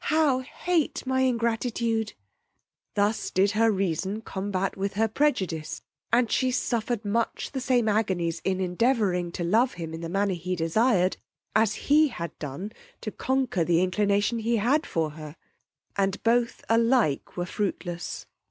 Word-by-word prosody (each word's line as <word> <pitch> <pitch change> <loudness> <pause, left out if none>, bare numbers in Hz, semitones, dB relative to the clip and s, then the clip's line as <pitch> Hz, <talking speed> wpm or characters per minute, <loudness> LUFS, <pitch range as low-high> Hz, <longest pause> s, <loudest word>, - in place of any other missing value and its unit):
how 305 -4 +3
hate 320 +5 -1
my 260 0 +1
ingratitude! 230 -2 0 0.8
Thus 205 +2 +1
did 195 +2 +2
her 225 +1 +3
reason 195 +1 -1
combat 195 -2 -2
with 195 0 -3
her 225 +2 +2
prejudice, 190 - -1 0.3
and 235 0 +3
she 260 - +2
suffered 235 -2 -1
much 225 +3 -1
the 265 - -3
same 245 -3 +2
agonies 185 -6 0
in 190 -1 0
endeavouring 185 -2 +1
to 175 - -3
love 225 +9 +3
him 165 -2 -6
in 165 - -6
the 165 - -4
manner 195 +2 +1
he 180 +1 -3
desired, 185 +3 +2 0.4
as 215 -1 +3
he 305 +2 +5
had 170 - -6
done 150 +8 -5 0.3
to 215 - -4
conquer 260 -9 0
the 170 +1 +3
inclination 205 +4 +1
he 230 +1 +1
had 270 +9 +2
for 160 -2 -1
her, 155 0 -9 0.6
and 195 0 0
both 235 +1 +1
alike 230 - +2
were 175 - -1
fruitless. 175 -3 -4
210 Hz, 150 wpm, -26 LUFS, 180-235 Hz, 0.8 s, he